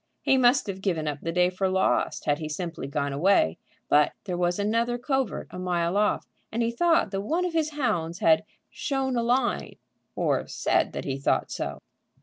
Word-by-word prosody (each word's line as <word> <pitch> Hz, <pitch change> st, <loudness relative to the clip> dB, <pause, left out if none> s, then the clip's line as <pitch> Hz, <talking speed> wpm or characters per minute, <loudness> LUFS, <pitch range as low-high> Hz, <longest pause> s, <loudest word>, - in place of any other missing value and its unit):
He 270 Hz, -, +4 dB
must 255 Hz, 0 st, +4 dB
have 195 Hz, -2 st, -5 dB
given 170 Hz, -6 st, -1 dB
up 145 Hz, -1 st, -3 dB
the 165 Hz, -, -2 dB
day 180 Hz, +1 st, +3 dB
for 190 Hz, +1 st, 0 dB
lost 190 Hz, 0 st, +1 dB
had 145 Hz, +1 st, +1 dB
he 155 Hz, -1 st, -4 dB
simply 165 Hz, -2 st, -4 dB
gone 140 Hz, 0 st, -2 dB
away. 145 Hz, -, +3 dB, 0.3 s
But 150 Hz, 0 st, +4 dB
there 185 Hz, -3 st, -3 dB
was 175 Hz, 0 st, 0 dB
another 230 Hz, +4 st, 0 dB
covert 265 Hz, +1 st, -1 dB
a 180 Hz, -, -7 dB
mile 175 Hz, -1 st, 0 dB
off, 210 Hz, +1 st, +1 dB, 0.3 s
and 235 Hz, +1 st, 0 dB
he 230 Hz, -, 0 dB
thought 330 Hz, +7 st, +2 dB
that 195 Hz, -1 st, -2 dB
one 330 Hz, -, 0 dB
of 355 Hz, -, -3 dB
his 320 Hz, -2 st, +1 dB
hounds 175 Hz, -, -1 dB
had 160 Hz, -2 st, +4 dB, 0.3 s
"shown 270 Hz, -2 st, -1 dB
a 235 Hz, -, +1 dB
line," 240 Hz, +1 st, 0 dB, 0.4 s
or -, -, 0 dB
said -, -, 0 dB
that -, -, -5 dB
he 135 Hz, -1 st, -3 dB
thought 140 Hz, -, 0 dB
so. -, -, -4 dB
190 Hz, 195 wpm, -26 LUFS, 165-245 Hz, 0.4 s, He